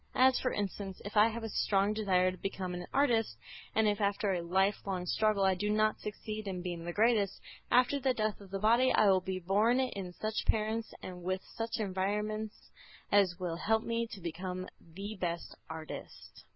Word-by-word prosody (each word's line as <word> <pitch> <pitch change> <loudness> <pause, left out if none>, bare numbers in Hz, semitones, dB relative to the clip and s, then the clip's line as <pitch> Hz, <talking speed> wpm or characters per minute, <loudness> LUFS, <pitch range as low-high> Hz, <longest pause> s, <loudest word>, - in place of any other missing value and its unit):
As, 260 0 +5
for 255 - 0
instance, 195 -1 -4
if 205 - -6
I 210 +1 +7
have 230 0 -4
a 225 - -3
strong 200 0 +2
desire 185 -4 +2
to 185 - -9
become 185 -1 -4
an 180 0 -5
artist, 230 - +2 0.4
and 220 0 +4
if 205 0 +1
after 200 0 +1
a 175 - -1
life 190 +4 +2
long 185 -2 -2
struggle 215 +2 +2
I 190 0 +4
do 205 +3 -2
not 215 +1 +2
succeed 215 0 -5
in 180 -2 -4
being 175 -2 -4
the 175 - -2
greatest, 210 -1 +2 0.3
after 250 +3 +4
the 260 -1 +1
death 215 -1 -1
of 195 - -12
the 195 - -3
body 235 +5 +4
I 205 -2 +5
will 185 -1 +3
be 190 0 -3
born 205 +7 +2
of 195 -9 -3
such 215 0 -3
parents 220 +1 0
and 180 -1 -7
with 185 +2 -2
such 225 0 -4
environments 210 +2 -2 0.4
as 195 -3 +4
will 175 -2 -2
help 220 +4 +1
me 230 0 -1
to 215 - -9
become 180 +2 -4
the 195 +6 -7
best 170 -2 -3 0.2
artist. 160 -1 -9
200 Hz, 195 wpm, -32 LUFS, 185-220 Hz, 0.4 s, I